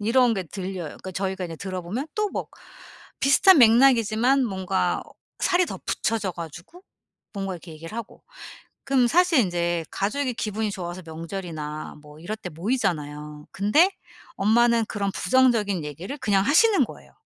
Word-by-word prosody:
이런 235 +2 +3
게 190 - -2
들려요. 185 +1 -5
그러니까 185 +4 -9
저희가 190 0 -3
이제 165 - -7
들어 185 +1 -5
보면 220 - -4
또 425 0 +1
막 - - -4 0.7
비슷한 335 +6 +6
맥락이지만 240 +1 +5
뭔가 190 -2 -1 0.4
살이 365 -1 +3
더 - - -6
붙여져 210 -5 -1
가지고 170 - -10 0.5
뭔가 195 -1 -3
이렇게 170 -1 -11
얘기를 165 +7 -9
하고 235 -2 -8 0.6
그럼 270 -3 +3
사실 355 +2 +4
인제 175 -4 0
가족이 255 +6 -1
기분이 215 -1 -2
좋아서 180 -1 -6
명절이나 160 -2 -6
뭐 150 0 -14
이럴 210 +6 -5
때 190 - -7
모이잖아요. 150 - -3
근데 215 - +4 0.5
엄마는 230 +2 +3
그런 200 -2 -2
부정적인 225 -10 +2
얘기를 165 - -6
그냥 200 -6 +2
하시는 405 +8 +5
거예요. - - -13
200 Hz, 345 characters per minute, -24 LUFS, 175-245 Hz, 0.7 s, 비슷한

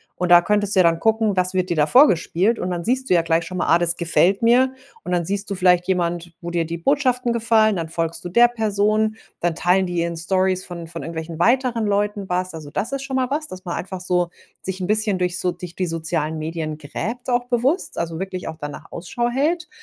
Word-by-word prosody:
Und 180 - -2
da 175 - +9
könntest 205 +2 +1
du 190 - +4
ja - - +4
dann 165 -1 +3
gucken, 220 -2 +1
was 180 0 +1
wird 185 -1 0
dir 170 - -1
da 150 - +4
vorgespielt? 195 - +3
Und 180 - -3
dann 175 -1 -3
siehst 260 +4 0
du - - +4
ja 170 - +4
gleich 165 0 0
schon 185 +2 -6
mal: - - -1
„Ah, - - +6
das 170 0 +5
gefällt 175 +3 +2
mir.“ 250 +3 +4 0.3
Und 180 - -2
dann 175 -1 +1
siehst 200 +3 -2
du 200 - -2
vielleicht 180 -1 +3
jemand, 175 -2 -1
wo 170 0 -5
dir 170 -1 0
die 170 +1 -5
Botschaften 250 - +1
gefallen, 220 -3 +2
dann 165 -1 -3
folgst 165 +1 -3
du - - -1
der 240 +5 +5
Person, 215 -1 0 0.2
dann 170 -2 -1
teilen 185 +2 +2
die 175 -1 -2
in 170 0 -3
Storys 185 +2 0
von 170 -2 -8
von 165 -2 -7
irgendwelchen 160 +1 -6
weiteren 235 +2 +2
Leuten 205 -1 -1
was. 180 0 -2
Also, 155 -3 -8
das 180 - -3
ist 275 0 -3
schon 275 -1 -4
mal 255 -1 0
was, 305 +1 -1
dass 185 -6 -9
man 175 - -4
einfach 190 -1 -6
so 180 -1 0 0.3
sich 190 0 -4
'n 180 - -2
bisschen 215 -2 +1
durch 180 0 0
so 180 -1 0
durch 175 -1 -9
die 185 - -2
sozialen 160 -1 -2
Medien 155 -1 -4
gräbt 225 - -5
auch 245 0 +1
bewusst, 255 +8 0
also, 165 -1 -3
wirklich 185 -3 -5
auch 160 - -8
danach 145 -1 -8
Ausschau 235 +8 -3
hält. 310 +5 -1
185 Hz, 240 wpm, -21 LUFS, 170-220 Hz, 0.3 s, da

